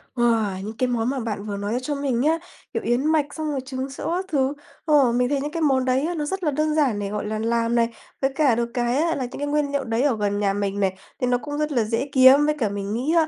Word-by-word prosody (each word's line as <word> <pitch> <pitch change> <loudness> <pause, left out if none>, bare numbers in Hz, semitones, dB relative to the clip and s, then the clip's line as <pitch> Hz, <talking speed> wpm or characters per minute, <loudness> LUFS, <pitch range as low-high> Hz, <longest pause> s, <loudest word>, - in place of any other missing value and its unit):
Wow! 225 -5 +1
Những 215 +2 -7
cái 255 - +1
món 240 -1 0
mà 270 0 -2
bạn 215 -4 -4
vừa 205 -1 -4
nói 205 +2 -3
ra 245 - 0
cho 290 +3 -2
mình 275 -4 -1
nhá, 315 +4 +3 0.4
kiểu, - - -2
yến 240 +4 +1
mạch 310 -2 +3
xong 310 -1 -3
rồi 280 - -1
trứng 260 0 -4
sữa 275 - -4
các 370 +1 -2
thứ. 275 -5 +1 0.3
Ồ, 290 -6 +4
mình 245 +1 +1
thấy 280 -1 0
những 295 +1 -3
cái 330 0 -3
món 265 -4 +2
đấy 260 +3 +1
á, 345 +1 -2
nó 300 -2 -2
rất 380 +5 -3
là 305 - +2
đơn 305 +2 0
giản 270 -9 +2
để, 200 -1 -3
gọi 210 0 -3
là, 215 +1 -3
làm 230 +1 0
này, 230 -1 +3 0.3
với 270 0 +2
cả 280 -6 +3
được 235 0 -1
cái 240 +1 0
á 330 +2 +1
là 260 - -2
những 245 - -8
cái 290 - -2
nguyên 290 -1 0
liệu 280 -1 0
đấy 230 -1 -1
ở 275 -6 +2
gần 205 -1 0
nhà 200 -1 +1
mình 200 0 -2
này, 190 -1 +1 0.3
thì 250 - +2
nó 245 0 +3
cũng 290 +3 -6
rất 300 0 -1
là 245 -5 +2
dễ 230 +6 -2
kiếm. 265 +1 +7
Với 300 0 +1
cả 220 -5 +1
mình 200 0 -4
nghĩ 260 +8 0
á, 320 -1 +4
260 Hz, 305 wpm, -23 LUFS, 225-290 Hz, 0.4 s, kiếm